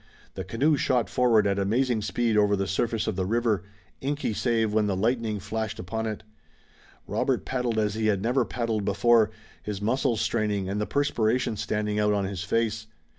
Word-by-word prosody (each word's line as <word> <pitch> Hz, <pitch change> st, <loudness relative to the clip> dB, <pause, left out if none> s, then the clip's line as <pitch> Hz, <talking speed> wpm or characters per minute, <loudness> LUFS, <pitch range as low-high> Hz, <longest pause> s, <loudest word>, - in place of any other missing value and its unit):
The 95 Hz, -, -5 dB
canoe 135 Hz, -, +1 dB
shot 125 Hz, -4 st, +1 dB
forward 115 Hz, -4 st, +3 dB
at 100 Hz, 0 st, +1 dB
amazing 115 Hz, +3 st, +1 dB
speed 115 Hz, +1 st, 0 dB
over 105 Hz, -1 st, +4 dB
the 100 Hz, 0 st, -1 dB
surface 110 Hz, +4 st, -1 dB
of -, -, -2 dB
the 95 Hz, -1 st, -1 dB
river, 110 Hz, -4 st, +1 dB, 0.4 s
inky 145 Hz, -4 st, -1 dB
save 115 Hz, -1 st, 0 dB
when 105 Hz, -1 st, +2 dB
the 100 Hz, -, 0 dB
lightning 110 Hz, +1 st, 0 dB
flashed 110 Hz, +2 st, -4 dB
upon 110 Hz, +5 st, -3 dB
it. 110 Hz, 0 st, -5 dB, 0.8 s
Robert -, -, -1 dB
paddled 125 Hz, -3 st, -1 dB
as 105 Hz, -1 st, +1 dB
he 110 Hz, 0 st, 0 dB
had 100 Hz, -3 st, +2 dB
never 120 Hz, +5 st, +1 dB
paddled 115 Hz, -3 st, -2 dB
before, 110 Hz, +2 st, +4 dB, 0.3 s
his 105 Hz, -2 st, -5 dB
muscles 115 Hz, +2 st, 0 dB
straining 105 Hz, -5 st, 0 dB
and 100 Hz, +2 st, -2 dB
the 105 Hz, -, -2 dB
perspiration 125 Hz, -4 st, +1 dB
standing 105 Hz, 0 st, -1 dB
out 105 Hz, 0 st, +3 dB
on 100 Hz, -1 st, 0 dB
his 95 Hz, -2 st, -4 dB
face. 110 Hz, +3 st, -1 dB
110 Hz, 180 wpm, -26 LUFS, 105-120 Hz, 0.8 s, over